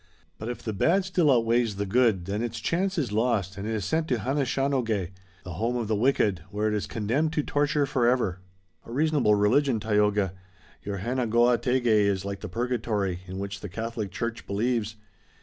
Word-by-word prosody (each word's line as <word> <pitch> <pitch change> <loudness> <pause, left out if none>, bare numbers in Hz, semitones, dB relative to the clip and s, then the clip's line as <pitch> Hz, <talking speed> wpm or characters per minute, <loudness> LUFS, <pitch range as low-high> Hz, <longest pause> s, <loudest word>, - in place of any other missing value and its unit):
But 110 - -5
if 120 - -6
the 110 - -3
bad 175 - +2
still 180 -5 +3
outweighs 115 -2 +2
the 100 +1 -2
good 105 -4 +2
then 100 +3 -2
its 120 -1 -3
chance 185 +8 -1
is 135 -9 -1
lost 105 -4 0
and 100 +2 -5
it 110 - -1
is 105 - -2
sent 160 0 0
to 130 - +1
Hanishaonogeh, 130 - 0 0.3
the 90 -3 -7
home 115 +8 -1
of 120 -3 -2
the 110 - +1
wicked, 105 -6 +2
where 105 +1 -1
it 105 - 0
is 105 - -2
condemned 130 +9 -1
to 150 - 0
torture 145 0 +1
forever." 120 -8 +1 0.4
"A - - -12
reasonable 145 -5 +3
religion, 120 +4 +3
Tayoga. 105 -3 +1 0.5
Your 100 -1 -4
Hanegoategeh 120 +3 +1
is 100 -4 +3
like 100 0 -4
the 105 - -7
purgatory, 110 -4 -1
in 95 +1 -6
which 100 0 -5
the 100 - -7
Catholic 110 +1 -4
church 115 +5 -4
believes. 110 +1 -1
115 Hz, 185 wpm, -27 LUFS, 100-125 Hz, 0.5 s, still